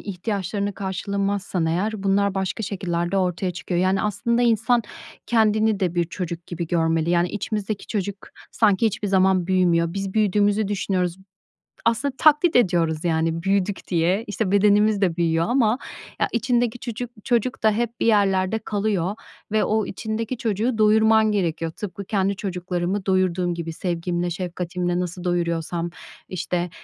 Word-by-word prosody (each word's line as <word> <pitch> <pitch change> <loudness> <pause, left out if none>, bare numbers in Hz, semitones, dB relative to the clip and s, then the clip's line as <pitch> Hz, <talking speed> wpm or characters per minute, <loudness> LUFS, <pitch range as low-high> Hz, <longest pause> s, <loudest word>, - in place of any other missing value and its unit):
ihtiyaçlarını 200 0 -3
karşılamazsan 195 -1 -2
eğer 195 +6 -1
bunlar 200 0 +2
başka 190 +3 -2
şekillerde 180 -3 -2
ortaya 180 0 0
çıkıyor. 175 0 -2
Yani, 190 +1 +2
aslında 235 +4 0
insan 235 +1 +3 0.4
kendini 220 -2 +2
de 180 -2 0
bir 175 -1 +2
çocuk 170 0 -6
gibi 170 -1 -4
görmeli. 165 -1 +1
Yani, 175 0 +2
içimizdeki 210 0 -3
çocuk 200 -2 -2 0.4
sanki 215 -1 +3
hiçbir 210 -1 -2
zaman 190 -2 +3
büyümüyor. 175 -2 +2
Biz 195 -1 -4
büyüdüğümüzü 205 0 +2
düşünüyoruz. 185 -3 -1 0.7
Aslında 255 +4 +1
taklit 310 +2 +4
ediyoruz, 170 -8 +2
yani, 165 0 0
büyüdük 195 0 0
diye. 180 +4 +1
İşte, 205 -2 -2
bedenimiz 205 +1 +4
de 180 -3 +1
büyüyor 165 -1 +2
ama 240 -1 +2 0.4
ya, - - +3
içindeki 240 0 0
çucu 240 +1 -5 0.2
çocuk 245 +1 0
da 220 - +5
hep 235 +2 -2
bir - - 0
yerlerde 200 -1 +2
kalıyor 205 -3 -1 0.4
ve 215 0 +2
o 215 -1 +1
içindeki 220 +4 -4
çocuğu 225 +2 -1
doyurman 220 0 +4
gerekiyor. 165 -5 -1
Tıpkı 200 +2 -7
kendi 195 0 0
çocuklarımı 180 0 -3
doyurduğum 185 -2 +1
gibi. 165 -1 -5
Sevgimle, 175 0 -2
şefkatimle 175 0 -2
nasıl 180 0 -4
doyuruyorsam, 170 -1 -1 0.4
işte, 180 0 -2
195 Hz, 140 wpm, -23 LUFS, 175-215 Hz, 0.7 s, da